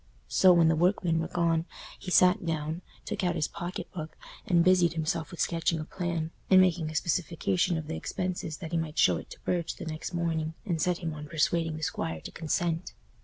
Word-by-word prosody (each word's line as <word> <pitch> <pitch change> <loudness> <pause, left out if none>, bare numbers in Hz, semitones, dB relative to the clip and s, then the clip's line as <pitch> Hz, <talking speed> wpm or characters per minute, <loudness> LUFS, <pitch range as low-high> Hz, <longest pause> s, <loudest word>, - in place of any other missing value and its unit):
So, 185 - +6
when 170 -2 +5
the 160 - +4
workmen 175 -1 +2
were 165 - -2
gone, 165 -1 +1 0.3
he 185 - -7
sat 180 +2 +5
down, 160 0 -2 0.2
took - - -3
out 175 -1 +1
his 160 -2 0
pocket 175 +1 -6
book, 155 -3 -7 0.3
and 175 -4 +4
busied 180 -2 +4
himself 160 -1 -2
with 175 - -10
sketching 165 -1 +1
a 155 - -4
plan, 170 -2 -3 0.2
and 190 - +8
making 175 -4 +3
a 155 - -8
specification 170 - 0
of 160 - -4
the 160 +2 -4
expenses 180 -4 -3
that 165 -3 -7
he 170 - +1
might 160 -1 -4
show - - +5
it - - -9
to - - -11
Burge 170 -2 -1
the - - -8
next 155 +1 -5
morning, 165 -2 -1
and 170 -6 -1
set 180 0 +1
him 165 -1 -2
on 150 0 -7
persuading 165 0 0
the 155 - -7
squire 80 - -2
to - - -8
consent. 165 +1 -2
165 Hz, 215 wpm, -29 LUFS, 160-175 Hz, 0.3 s, and